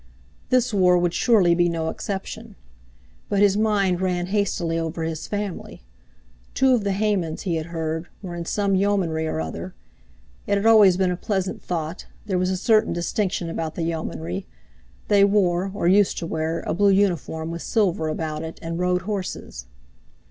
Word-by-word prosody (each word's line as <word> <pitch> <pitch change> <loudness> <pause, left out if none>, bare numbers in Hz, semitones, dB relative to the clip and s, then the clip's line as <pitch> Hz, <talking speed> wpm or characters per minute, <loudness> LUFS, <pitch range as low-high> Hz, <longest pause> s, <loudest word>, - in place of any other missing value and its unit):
This 250 -2 +2
war 180 -2 +4
would 175 -1 +1
surely 200 -8 +4
be 175 0 +2
no 165 -1 -2
exception. 205 +4 -6 0.7
But 200 - 0
his 200 -1 +5
mind 200 -4 +1
ran 180 -1 0
hastily 175 -5 0
over 165 0 -3
his 160 -1 -4
family. 205 - -5 0.7
Two 265 -1 +4
of 235 -4 +2
the 200 -1 0
Haymans, 195 -6 -1
he 175 -4 -1
had 160 0 -4
heard, 160 0 -3 0.2
were 180 -2 -6
in 170 -1 -5
some 200 +2 0
Yeomanry 185 -5 +1
or 80 - -2
other—it - - -7
had 200 - -2
always 210 -5 +7
been 185 -1 +2
a - - -1
pleasant 190 0 -2
thought, 165 0 -4 0.2
there 190 -3 0
was 185 0 +1
a 190 - 0
certain 215 +3 +3
distinction 180 0 -1
about 165 -1 -4
the 170 - -2
Yeomanry; 90 - -4 0.6
they 200 -1 +5
wore, 195 -2 +2
or 195 -3 -1
used 200 +2 +4
to - - -3
wear, 160 0 -2
a - - -2
blue 200 +3 +3
uniform 175 -5 +1
with 170 0 -5
silver 185 -8 0
about 155 0 -3
it, 160 0 -7
and 165 +1 -4
rode 180 0 +1
horses. 185 - -5
180 Hz, 170 wpm, -23 LUFS, 165-200 Hz, 0.7 s, always